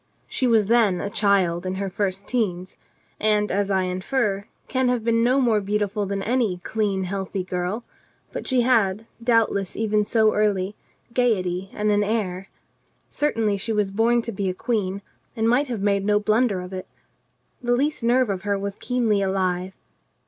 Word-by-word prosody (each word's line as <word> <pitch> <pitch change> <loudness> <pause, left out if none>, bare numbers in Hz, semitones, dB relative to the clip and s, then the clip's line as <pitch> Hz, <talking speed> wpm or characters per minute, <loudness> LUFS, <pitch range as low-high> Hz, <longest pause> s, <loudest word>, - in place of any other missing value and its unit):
She 255 - 0
was 225 -3 +4
then 215 -4 +3
a 200 - -3
child 190 -5 +2
in 185 0 -3
her 195 +1 -2
first 195 0 -2
teens, 185 -7 -2 0.4
and, 210 -1 +2
as 200 +1 0
I 190 -1 +2
infer, 195 +2 -1 0.2
can 260 -1 +1
have 245 -3 0
been 230 0 +2
no 255 +3 +3
more 230 -5 +3
beautiful 205 0 -1
than 195 0 -2
any 230 -5 +1
clean, 205 -3 -1
healthy 190 0 -3
girl, 180 +5 -3 0.5
but - - -5
she 255 -2 +3
had, 225 -4 +2 0.2
doubtless 225 -5 +1
even 215 -1 +1
so 220 0 +3
early, 205 -2 +1 0.4
gaiety 190 -7 0
and 210 0 0
an 205 0 +3
air. 195 -3 -2 0.6
Certainly 225 -8 0
she 220 +3 -3
was 210 -2 0
born 230 +3 +2
to 230 - -4
be 195 -2 -2
a 180 - -3
queen 200 -3 -2 0.3
and 225 -1 +1
might 255 +5 +3
have 235 -5 -4
made 200 -1 +2
no 210 +1 +3
blunder 215 -2 +1
of 180 +1 -8
it. 185 0 -6 0.7
The 245 0 +2
least 290 +4 0
nerve 240 -1 +3
of 190 -2 -3
her 205 0 0
was 200 0 -4
keenly 235 -5 +1
alive. 185 -1 -1
205 Hz, 175 wpm, -23 LUFS, 195-230 Hz, 0.7 s, was